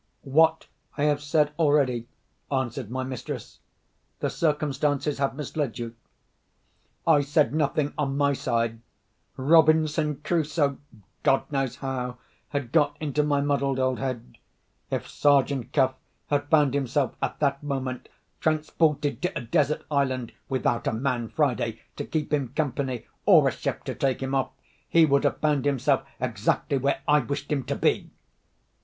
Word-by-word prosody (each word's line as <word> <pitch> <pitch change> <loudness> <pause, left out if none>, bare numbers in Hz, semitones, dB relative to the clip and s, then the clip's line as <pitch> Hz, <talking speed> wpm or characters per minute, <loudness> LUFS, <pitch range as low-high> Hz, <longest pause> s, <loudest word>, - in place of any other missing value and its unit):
"What 160 +3 +3 0.3
I 145 - 0
have 145 -1 +2
said 150 0 +1
already," 140 -7 +2 0.4
answered 130 -3 -2
my 130 +2 -2
mistress. 130 -2 -6 0.6
"The - - -1
circumstances 150 -2 0
have 135 -1 0
misled 145 -3 -3
you." 115 -1 -5 1.1
I 155 -3 +5
said 145 +1 +2
nothing 145 -1 0
on 140 -2 0
my 140 0 +3
side. 115 -3 -1 0.6
Robinson 155 +1 +4
Crusoe—God 145 - -1
knows 135 -3 -1
how—had 125 0 -5
got 145 -2 +3
into 150 -1 0
my 145 -1 +1
muddled 140 -2 0
old 130 -1 0
head. 125 - -5 0.5
If - - -2
Sergeant 140 -3 +2
Cuff 130 -3 +3 0.4
had 145 0 0
found 150 -4 +4
himself, 135 -1 0
at - - -2
that 140 -2 +1
moment, 135 -3 -4 0.3
transported 155 -1 +1
to 180 +1 -1
a - - -3
desert 150 +5 +1
island, 130 -4 0 0.2
without 125 -2 0
a - - +1
man 120 -1 -1
Friday 120 -7 0 0.2
to - - -3
keep 155 -2 -2
him 135 -4 0
company, 135 -4 -2 0.2
or - - +7
a - - +2
ship - - -4
to - - -4
take 135 -1 -1
him 135 +1 -3
off—he 150 +4 +1
would 140 -2 +2
have - - +1
found 150 -3 +1
himself 140 -4 +2 0.2
exactly 140 - 0
where 140 +1 0
I 150 0 +5
wished 140 +3 -4
him 140 -3 0
to - - -2
be! - - +1
140 Hz, 145 wpm, -26 LUFS, 130-150 Hz, 1.1 s, or